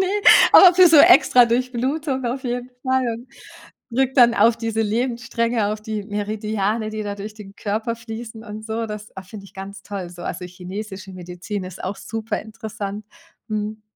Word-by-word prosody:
Ne, 380 Hz, -, +2 dB, 0.5 s
aber 360 Hz, -2 st, +9 dB
für 365 Hz, -1 st, +7 dB
so 320 Hz, -, +6 dB
extra 285 Hz, -7 st, +7 dB
Durchblutung 255 Hz, +3 st, -1 dB
auf 255 Hz, +3 st, -3 dB
jeden 245 Hz, 0 st, -3 dB
Fall 260 Hz, -1 st, +1 dB
und 240 Hz, +3 st, -11 dB, 0.6 s
wirkt 265 Hz, +3 st, 0 dB
dann 240 Hz, -2 st, +6 dB
auf 225 Hz, +2 st, +4 dB
diese 225 Hz, -1 st, -2 dB
Lebensstränge, 235 Hz, 0 st, -1 dB
auf 210 Hz, 0 st, -3 dB
die 215 Hz, -1 st, -4 dB
Meridiane, 210 Hz, +1 st, -2 dB
die 215 Hz, 0 st, -4 dB
da 205 Hz, -1 st, -4 dB
durch 210 Hz, +1 st, -8 dB
den 200 Hz, -2 st, -12 dB
Körper 220 Hz, +3 st, -3 dB
fließen 225 Hz, 0 st, -8 dB
und 215 Hz, 0 st, -8 dB
so. 225 Hz, +1 st, -3 dB
Das, 210 Hz, -1 st, -9 dB
ah, 190 Hz, -, -6 dB
finde 200 Hz, +1 st, -11 dB
ich 195 Hz, -, -16 dB
ganz 195 Hz, +1 st, -9 dB
toll 190 Hz, -4 st, -6 dB
so. 175 Hz, 0 st, -11 dB
Also, 180 Hz, -, -5 dB
chinesische 190 Hz, +2 st, -8 dB
Medizin 180 Hz, +3 st, -6 dB
ist 185 Hz, -1 st, -9 dB
auch 195 Hz, +2 st, -4 dB
superinteressant, 215 Hz, -2 st, -6 dB, 0.4 s
mhm. 215 Hz, 0 st, -4 dB
220 Hz, 170 wpm, -21 LUFS, 205-240 Hz, 0.6 s, aber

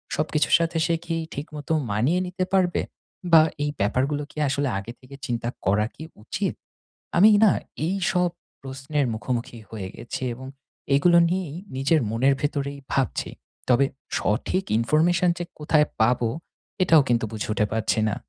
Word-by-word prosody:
সবকিছুর 155 Hz, 0 st, +2 dB
সাথে 165 Hz, 0 st, -1 dB
সে 170 Hz, -, +1 dB
কি 165 Hz, -1 st, -2 dB, 0.2 s
ঠিকমতো 150 Hz, +1 st, -5 dB, 0.2 s
মানিয়ে 130 Hz, -, +2 dB
নিতে 185 Hz, +1 st, -2 dB
পারবে? 180 Hz, -2 st, +2 dB, 0.5 s
বা 160 Hz, -1 st, +9 dB, 0.2 s
এই 145 Hz, -, 0 dB
ব্যাপারগুলো 135 Hz, +8 st, 0 dB
কি -, -, -20 dB
আসলে 140 Hz, +1 st, 0 dB
আগে 105 Hz, +4 st, -8 dB
থেকে 130 Hz, +2 st, -13 dB
চিন্তা 120 Hz, -1 st, -2 dB, 0.2 s
করা 100 Hz, +3 st, +3 dB
কি 160 Hz, -, -9 dB, 0.2 s
উচিৎ? -, -, -2 dB, 0.6 s
আমি 210 Hz, +5 st, +8 dB, 0.2 s
না 195 Hz, -, +6 dB, 0.4 s
এই 190 Hz, -, 0 dB, 0.2 s
সব 180 Hz, -1 st, +2 dB, 0.3 s
প্রশ্নের 135 Hz, +2 st, -2 dB
মুখোমুখি 120 Hz, +2 st, -4 dB
হয়ে 100 Hz, -4 st, -6 dB
গেছি, 120 Hz, -, -6 dB
এবং 130 Hz, +2 st, -9 dB, 0.5 s
এগুলো 170 Hz, +4 st, +5 dB
নিয়েই 180 Hz, -5 st, -2 dB, 0.2 s
নিজের 140 Hz, +3 st, +2 dB
মনের 130 Hz, +5 st, +3 dB
ভেতরেই 140 Hz, -1 st, -2 dB
ভাবছি। 135 Hz, -2 st, 0 dB, 0.4 s
তবে 130 Hz, +3 st, +5 dB, 0.3 s
সঠিক 125 Hz, -, 0 dB
ইনফরমেশন 165 Hz, +8 st, +2 dB
যে 175 Hz, -, -3 dB, 0.2 s
কোথায় 150 Hz, 0 st, +3 dB, 0.2 s
পাবো 120 Hz, 0 st, +3 dB, 0.5 s
এটাও 165 Hz, -4 st, +6 dB
কিন্তু 115 Hz, -2 st, +2 dB
বুঝে 110 Hz, -1 st, -4 dB
উঠে 105 Hz, 0 st, +1 dB
পারছি 110 Hz, 0 st, 0 dB
না। -, -, -2 dB
140 Hz, 150 wpm, -24 LUFS, 120-165 Hz, 0.6 s, বা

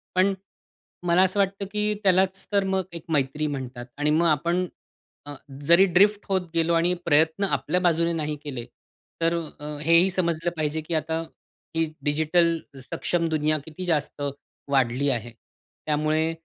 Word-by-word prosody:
पण 190 Hz, +2 st, +4 dB, 0.7 s
मला 175 Hz, +2 st, +5 dB
असं 190 Hz, +2 st, +1 dB
वाटतं 195 Hz, 0 st, 0 dB
की 210 Hz, 0 st, +1 dB
त्यालाच 190 Hz, 0 st, +2 dB
तर 200 Hz, -1 st, +3 dB
अ, -, -, -4 dB
मग 190 Hz, -1 st, +1 dB
एक 170 Hz, -, -7 dB
मैत्री 150 Hz, +1 st, 0 dB
म्हणतात 130 Hz, -3 st, -5 dB
आणि 150 Hz, +1 st, +1 dB
मग 165 Hz, +3 st, +3 dB
आपण 170 Hz, +4 st, +1 dB, 0.6 s
अ, 145 Hz, -, -7 dB, 0.3 s
जरी 170 Hz, +4 st, +7 dB
ड्रिफ्ट 200 Hz, +3 st, +3 dB
होत 185 Hz, -3 st, 0 dB
गेलो 165 Hz, +1 st, +2 dB
आणि 170 Hz, +2 st, +3 dB
प्रयत्न 160 Hz, +4 st, +3 dB
आपल्या 180 Hz, -2 st, 0 dB
बाजूने 170 Hz, -1 st, +2 dB
नाही 150 Hz, -2 st, -2 dB
केले 130 Hz, -5 st, -5 dB, 0.6 s
तर 165 Hz, +1 st, +2 dB, 0.2 s
अ, 150 Hz, 0 st, -6 dB
हे 165 Hz, +2 st, +5 dB
ही 190 Hz, +2 st, +3 dB
समजलं 170 Hz, -2 st, 0 dB
पाहिजे, 155 Hz, 0 st, -1 dB
की 165 Hz, +2 st, -5 dB
आता 160 Hz, +1 st, -1 dB, 0.5 s
ही 165 Hz, -, +2 dB, 0.2 s
डिजिटल 160 Hz, +3 st, +2 dB, 0.2 s
सक्षम 170 Hz, +5 st, -1 dB
दुनिया 155 Hz, 0 st, +1 dB
किती 160 Hz, +3 st, -7 dB
जास्त 150 Hz, -3 st, -1 dB, 0.5 s
वाढली 135 Hz, +1 st, +2 dB
आहे. 120 Hz, -2 st, -2 dB, 0.5 s
त्यामुळे 155 Hz, +1 st, +1 dB
165 Hz, 155 wpm, -25 LUFS, 150-180 Hz, 0.7 s, जरी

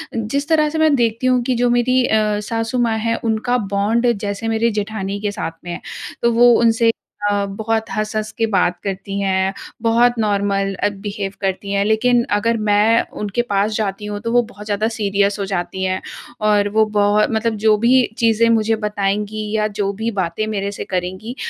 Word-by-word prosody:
जिस 255 Hz, +6 st, -2 dB
तरह 305 Hz, -1 st, +3 dB
से 315 Hz, -, -4 dB
मैं 315 Hz, -2 st, +4 dB
देखती 235 Hz, +1 st, 0 dB
हूँ 255 Hz, -1 st, +3 dB
कि 255 Hz, 0 st, 0 dB
जो 245 Hz, +1 st, +2 dB
मेरी 245 Hz, +1 st, +2 dB
अ, 215 Hz, -1 st, +1 dB
सासू 225 Hz, +3 st, -3 dB
माँ 230 Hz, -2 st, +1 dB
है, 230 Hz, +1 st, 0 dB
उनका 225 Hz, +2 st, 0 dB, 0.2 s
बॉन्ड 230 Hz, +5 st, +2 dB
जैसे 205 Hz, +2 st, -4 dB
मेरे 225 Hz, +1 st, +1 dB
जेठानी 200 Hz, -1 st, -4 dB
के 205 Hz, -1 st, -1 dB
साथ 165 Hz, -, -4 dB
में 175 Hz, -, -6 dB
है, -, -, -6 dB, 0.4 s
तो 235 Hz, 0 st, +3 dB
वो 245 Hz, -, +8 dB
उनसे 230 Hz, 0 st, +3 dB, 0.4 s
अ, 200 Hz, 0 st, 0 dB
बहुत 220 Hz, +2 st, -1 dB
हँस-हँस 215 Hz, 0 st, -2 dB
के 225 Hz, -, +2 dB
बात 180 Hz, -1 st, +2 dB
करती 195 Hz, 0 st, -4 dB
हैं। 190 Hz, 0 st, 0 dB, 0.3 s
बहुत 235 Hz, +1 st, +3 dB
नॉर्मल 200 Hz, -2 st, 0 dB
अ, 205 Hz, +2 st, 0 dB
बिहेव 200 Hz, 0 st, -5 dB
करती 195 Hz, +1 st, -2 dB
हैं। 200 Hz, 0 st, +1 dB
लेकिन 235 Hz, +3 st, +3 dB
अगर 230 Hz, +2 st, +1 dB
मैं 215 Hz, +3 st, +4 dB, 0.2 s
उनके 210 Hz, +3 st, -1 dB
पास 200 Hz, +2 st, +1 dB
जाती 210 Hz, -1 st, -2 dB
हूँ 205 Hz, 0 st, -4 dB
तो 230 Hz, 0 st, -3 dB
वो 245 Hz, -, +4 dB
बहुत 205 Hz, +2 st, -11 dB
ज़्यादा 215 Hz, +1 st, 0 dB
सीरियस 200 Hz, -1 st, 0 dB
हो 200 Hz, -, -1 dB
जाती 190 Hz, 0 st, -2 dB
हैं। 185 Hz, 0 st, -1 dB, 0.5 s
और 205 Hz, -1 st, +3 dB
वो 220 Hz, +1 st, +3 dB
बहुत 205 Hz, +1 st, +3 dB
मतलब 220 Hz, 0 st, 0 dB
जो 215 Hz, -1 st, +5 dB
भी 255 Hz, +2 st, +5 dB
चीज़ें 230 Hz, -1 st, +3 dB
मुझे 225 Hz, 0 st, +2 dB
बताएँगी 210 Hz, 0 st, -2 dB
या 215 Hz, 0 st, +1 dB
जो 200 Hz, -1 st, +1 dB
भी 230 Hz, -, 0 dB
बातें 180 Hz, +4 st, -1 dB
मेरे 200 Hz, -2 st, -2 dB
से -, -, -6 dB
करेंगी, 185 Hz, +6 st, -4 dB
215 Hz, 195 wpm, -19 LUFS, 200-230 Hz, 0.5 s, वो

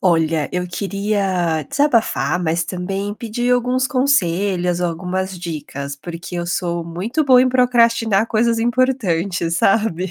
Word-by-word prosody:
Olha, 165 Hz, -4 st, +1 dB
eu 180 Hz, 0 st, -2 dB
queria 195 Hz, -4 st, -1 dB
desabafar 265 Hz, -10 st, +1 dB
mas 165 Hz, 0 st, 0 dB
também 195 Hz, +4 st, -4 dB
pedir 240 Hz, +2 st, -2 dB
alguns 250 Hz, +1 st, +1 dB
conselhos 190 Hz, -, +1 dB
ou 180 Hz, -, +1 dB
algumas 185 Hz, +2 st, -4 dB
dicas, 145 Hz, -4 st, -6 dB
porque 170 Hz, +4 st, -7 dB
eu 170 Hz, 0 st, -3 dB
sou 170 Hz, -1 st, -2 dB
muito 185 Hz, -, -2 dB
boa 255 Hz, -2 st, +6 dB
em 260 Hz, -, +2 dB
procrastinar 230 Hz, -4 st, +3 dB
coisas 230 Hz, +1 st, +1 dB
importantes 200 Hz, -9 st, 0 dB
sabe? 190 Hz, -3 st, +1 dB
190 Hz, 130 wpm, -19 LUFS, 170-235 Hz, -, boa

